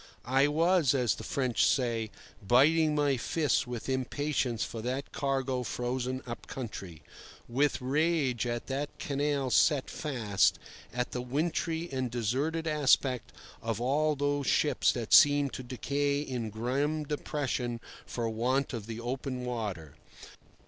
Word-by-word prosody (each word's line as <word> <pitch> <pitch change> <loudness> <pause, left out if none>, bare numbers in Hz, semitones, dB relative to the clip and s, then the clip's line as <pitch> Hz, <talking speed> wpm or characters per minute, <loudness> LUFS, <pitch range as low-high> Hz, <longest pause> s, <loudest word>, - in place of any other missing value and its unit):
I 135 +4 +3
was, 160 -1 +3
as 125 -5 +2
the - - -8
French 130 -4 0
say, 115 -5 +1 0.3
biting 150 +8 +4
my 145 -2 +2
fists 150 +2 0
with 120 -2 -5
impatience 130 -2 -1
for 115 - -5
that 130 +4 -3
cargo 135 -2 -1
frozen 125 +2 -3
up 120 -1 -7
country; 100 - -7 0.4
with 140 +5 +1
rage 135 -3 +1
at 120 0 -3
that 140 +2 -2
canal 140 -2 -1
set 140 +3 +3
fast, 115 - +1 0.3
at 125 0 -2
the 125 - -3
wintry 160 +5 -1
and 130 -2 -1
deserted 130 +8 -1
aspect 140 -5 +2 0.3
of 115 -1 -2
all 150 +5 +1
those 145 0 -1
ships - - +3
that - - -3
seemed 145 -1 +6
to - - -5
decay 140 +3 -1
in 125 -6 -3
grim 135 +8 -1
depression 135 -5 -2 0.3
for 115 -2 -2
want 125 +5 0
of 110 -3 -5
the 115 0 -5
open 125 +1 -4
water. 100 - -4
130 Hz, 135 wpm, -30 LUFS, 120-145 Hz, 0.4 s, seemed